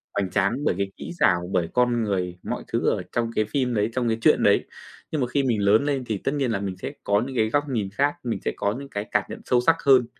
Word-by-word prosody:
hoành 95 Hz, -2 st, 0 dB
tráng 100 Hz, +4 st, +2 dB
bởi -, -, +2 dB
cái 100 Hz, 0 st, -2 dB
kỹ -, -, -7 dB
xảo, 90 Hz, 0 st, +3 dB
bởi 85 Hz, -2 st, +1 dB
con 120 Hz, -2 st, +2 dB
người, 90 Hz, -4 st, -2 dB
mọi -, -, -4 dB
thứ -, -, +1 dB
ở -, -, 0 dB
trong 115 Hz, -1 st, -1 dB
cái 110 Hz, -, +2 dB
phim 125 Hz, +2 st, -1 dB
đấy, 105 Hz, +1 st, +1 dB
trong 125 Hz, -2 st, 0 dB
cái 110 Hz, 0 st, +1 dB
chuyện -, -, +4 dB
đấy. -, -, +4 dB, 0.5 s
Nhưng 155 Hz, -4 st, -1 dB
mà 125 Hz, -, +1 dB
khi 140 Hz, +2 st, 0 dB
mình 115 Hz, -5 st, +1 dB
lớn 110 Hz, +7 st, +4 dB
lên 140 Hz, -3 st, 0 dB
thì 110 Hz, -3 st, -2 dB
tất 135 Hz, -, -2 dB
nhiên 135 Hz, -5 st, 0 dB
là 100 Hz, -, 0 dB
mình 95 Hz, -2 st, -4 dB
sẽ -, -, -5 dB
có 100 Hz, +1 st, +2 dB
những 130 Hz, -, -7 dB
cái 110 Hz, -1 st, +2 dB
góc 145 Hz, +4 st, +2 dB
nhìn 110 Hz, -6 st, -1 dB
khác, 145 Hz, +5 st, +1 dB
mình 115 Hz, -5 st, -2 dB
sẽ -, -, +1 dB
có 100 Hz, +1 st, 0 dB
những 140 Hz, -, -9 dB
cái 105 Hz, -4 st, -3 dB
cảm -, -, +2 dB
nhận -, -, -7 dB
sâu 125 Hz, -, +3 dB
sắc 165 Hz, +6 st, +4 dB
hơn, 130 Hz, -3 st, +6 dB
115 Hz, 285 wpm, -24 LUFS, 100-130 Hz, 0.5 s, hơn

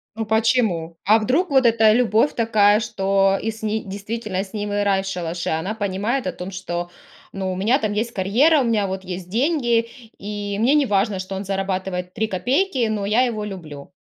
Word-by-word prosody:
Ну 225 Hz, 0 st, -3 dB
почему? 220 Hz, -7 st, +1 dB
А 215 Hz, +3 st, +6 dB
вдруг 270 Hz, +12 st, +1 dB
вот 265 Hz, -2 st, +3 dB
эта 225 Hz, -2 st, +5 dB
любовь 230 Hz, +3 st, +2 dB
такая, 215 Hz, -2 st, +4 dB
что 195 Hz, -3 st, +1 dB
и 225 Hz, -, -2 dB
с 220 Hz, 0 st, -8 dB
не 215 Hz, 0 st, -1 dB
действительно 205 Hz, 0 st, -4 dB
с 195 Hz, -, -14 dB
ним 205 Hz, -1 st, -3 dB
и 205 Hz, 0 st, 0 dB
рай 195 Hz, -1 st, +2 dB
в 195 Hz, -, -7 dB
шалаше. 175 Hz, -2 st, -3 dB
Она 160 Hz, +7 st, -2 dB
понимает 205 Hz, +4 st, -2 dB
о 185 Hz, -, 0 dB
том, 180 Hz, +2 st, -7 dB
что, 175 Hz, -2 st, -5 dB, 0.4 s
ну, 190 Hz, -1 st, -3 dB
у 185 Hz, -, -3 dB
меня 225 Hz, +9 st, +2 dB
там 215 Hz, -3 st, -1 dB
есть 225 Hz, +3 st, -1 dB
карьера, 240 Hz, -, +3 dB
у -, -, +1 dB
меня 225 Hz, -4 st, +1 dB
вот 190 Hz, 0 st, -4 dB
есть 180 Hz, -1 st, -6 dB
деньги, 240 Hz, -, +1 dB, 0.3 s
и 205 Hz, 0 st, -4 dB
мне 255 Hz, +6 st, +3 dB
неважно, 205 Hz, -8 st, +2 dB
что 185 Hz, +1 st, -6 dB
он 195 Hz, -, -5 dB
зарабатывает 190 Hz, -2 st, -3 dB
3 220 Hz, -, -1 dB
копейки, 250 Hz, -, 0 dB
но 205 Hz, -2 st, -2 dB
я 215 Hz, +4 st, +3 dB
его 220 Hz, -4 st, -2 dB
люблю. 160 Hz, -8 st, -8 dB
205 Hz, 200 wpm, -21 LUFS, 190-230 Hz, 0.4 s, А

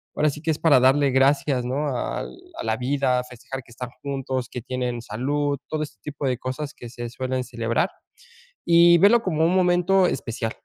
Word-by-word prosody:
ahora 150 Hz, -1 st, +2 dB
sí 150 Hz, -, -9 dB
que 165 Hz, -, -3 dB
es 155 Hz, -, +1 dB
para 150 Hz, -5 st, +5 dB
darle 135 Hz, +2 st, +4 dB
gracias, 135 Hz, 0 st, +2 dB
¿no?, 135 Hz, +2 st, -2 dB
al -, -, -3 dB, 0.3 s
a -, -, -3 dB
la -, -, 0 dB
vida, 130 Hz, -1 st, +1 dB
a -, -, -3 dB
festejar 125 Hz, +2 st, -8 dB
que -, -, -23 dB
están 125 Hz, +1 st, -7 dB
juntos, 135 Hz, -3 st, -3 dB
que 125 Hz, -, -6 dB
tienen 125 Hz, -1 st, -3 dB
salud, 140 Hz, +6 st, -1 dB
todo 155 Hz, -1 st, -1 dB
este 150 Hz, -, -10 dB
tipo 145 Hz, -1 st, -5 dB
de 125 Hz, -2 st, 0 dB
cosas 135 Hz, +4 st, -5 dB
que 120 Hz, -, -10 dB
se 120 Hz, 0 st, -6 dB
suelen 130 Hz, 0 st, -2 dB
celebrar. 115 Hz, +7 st, -1 dB, 0.8 s
Y 170 Hz, 0 st, +7 dB
verlo 220 Hz, +6 st, +5 dB
como 160 Hz, -3 st, +1 dB
un 175 Hz, -, +2 dB
momento 180 Hz, +1 st, +3 dB
especial. 115 Hz, -1 st, -3 dB
135 Hz, 195 wpm, -24 LUFS, 125-155 Hz, 0.8 s, Y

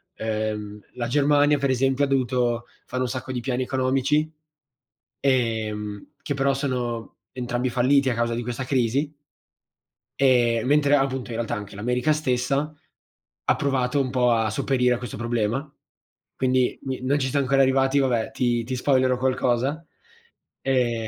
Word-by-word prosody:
ehm, 105 Hz, -1 st, -3 dB, 0.2 s
la 120 Hz, -1 st, -3 dB
Germania 145 Hz, +2 st, +3 dB
per 140 Hz, -1 st, 0 dB
esempio 135 Hz, +2 st, +2 dB
dovuto 125 Hz, -3 st, 0 dB, 0.2 s
fanno 130 Hz, 0 st, -2 dB
un 125 Hz, -, -2 dB
sacco 130 Hz, +1 st, -5 dB
di 125 Hz, -, -2 dB
piani 125 Hz, +1 st, -1 dB
economici, 135 Hz, +4 st, +1 dB, 0.9 s
ehm, 110 Hz, -5 st, -1 dB
che 145 Hz, -, -3 dB
però 140 Hz, 0 st, +1 dB
sono 125 Hz, -4 st, -3 dB, 0.2 s
entrambi 125 Hz, 0 st, -2 dB
falliti 130 Hz, +3 st, +3 dB
a -, -, +1 dB
causa 115 Hz, 0 st, 0 dB
di 120 Hz, -, -2 dB
questa 120 Hz, +2 st, -4 dB
crisi. 130 Hz, +3 st, 0 dB, 1.1 s
E 120 Hz, -4 st, +3 dB
mentre 145 Hz, +1 st, +4 dB
appunto 135 Hz, -2 st, -1 dB
in 115 Hz, -, -4 dB
realtà 115 Hz, -1 st, -2 dB
anche 105 Hz, -1 st, -6 dB
l'America 125 Hz, +7 st, 0 dB
stessa 140 Hz, 0 st, 0 dB, 0.8 s
ha -, -, +5 dB
provato 135 Hz, 0 st, 0 dB
un 130 Hz, -, -2 dB
po' 125 Hz, -1 st, +2 dB
a 110 Hz, -1 st, +2 dB
sopperire 125 Hz, +3 st, +1 dB
a -, -, -4 dB
questo 125 Hz, -3 st, -7 dB
problema. 120 Hz, +4 st, -1 dB, 0.6 s
Quindi 130 Hz, -1 st, +1 dB
mi 130 Hz, -1 st, -4 dB
non 140 Hz, +3 st, +1 dB
ci 130 Hz, -1 st, -1 dB
siam 140 Hz, +2 st, +1 dB
ancora 135 Hz, +1 st, +3 dB
arrivati, 135 Hz, +1 st, +3 dB
vabbè, 125 Hz, -4 st, 0 dB
ti 120 Hz, -2 st, 0 dB
ti 130 Hz, +3 st, -4 dB
spoilero 130 Hz, -1 st, +2 dB
qualcosa. 130 Hz, +4 st, 0 dB, 0.8 s
Ehm 120 Hz, -4 st, 0 dB
130 Hz, 150 wpm, -24 LUFS, 120-135 Hz, 1.1 s, ha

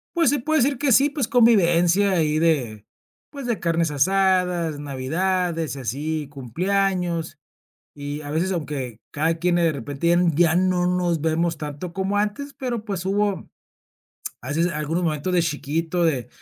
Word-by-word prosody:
Pues, 335 Hz, -1 st, +4 dB
se 290 Hz, -, +1 dB
puede 310 Hz, +3 st, +1 dB
decir 275 Hz, 0 st, +1 dB
que 280 Hz, -1 st, +1 dB
sí. 275 Hz, +5 st, +5 dB
Pues, 285 Hz, -6 st, -2 dB
convivencia 200 Hz, -6 st, +4 dB
ahí 155 Hz, -4 st, +1 dB
de, 125 Hz, -11 st, 0 dB, 0.4 s
pues 280 Hz, -3 st, -8 dB
de 235 Hz, -3 st, -1 dB
carnes 165 Hz, -2 st, 0 dB
asadas, 180 Hz, 0 st, +1 dB
navidades 165 Hz, +4 st, -1 dB
y -, -, -7 dB
así 150 Hz, +4 st, -3 dB
cumpleaños 175 Hz, -, -1 dB, 0.6 s
y 145 Hz, +1 st, -5 dB
a 145 Hz, -, -8 dB
veces, 170 Hz, +5 st, 0 dB
aunque 140 Hz, -, -4 dB
cada 160 Hz, +3 st, 0 dB
quien 175 Hz, 0 st, +1 dB
de 170 Hz, -2 st, +3 dB
repente 145 Hz, +5 st, -1 dB, 0.2 s
ya 170 Hz, 0 st, +3 dB
no 180 Hz, -1 st, +2 dB
nos 180 Hz, -2 st, 0 dB
vemos 165 Hz, +1 st, 0 dB
tanto 150 Hz, +4 st, -6 dB
como 195 Hz, +1 st, -1 dB
antes, 275 Hz, +8 st, -2 dB
pero, 245 Hz, -5 st, -4 dB
pues 190 Hz, -4 st, -4 dB
hubo 205 Hz, 0 st, -1 dB, 0.9 s
a 125 Hz, -, -9 dB
veces 165 Hz, +4 st, +1 dB
algunos 155 Hz, +4 st, -2 dB
momentos 160 Hz, +2 st, -1 dB
de 175 Hz, -2 st, +3 dB
chiquito, 165 Hz, +3 st, -1 dB
de 135 Hz, -8 st, 0 dB
170 Hz, 155 wpm, -23 LUFS, 150-195 Hz, 0.9 s, sí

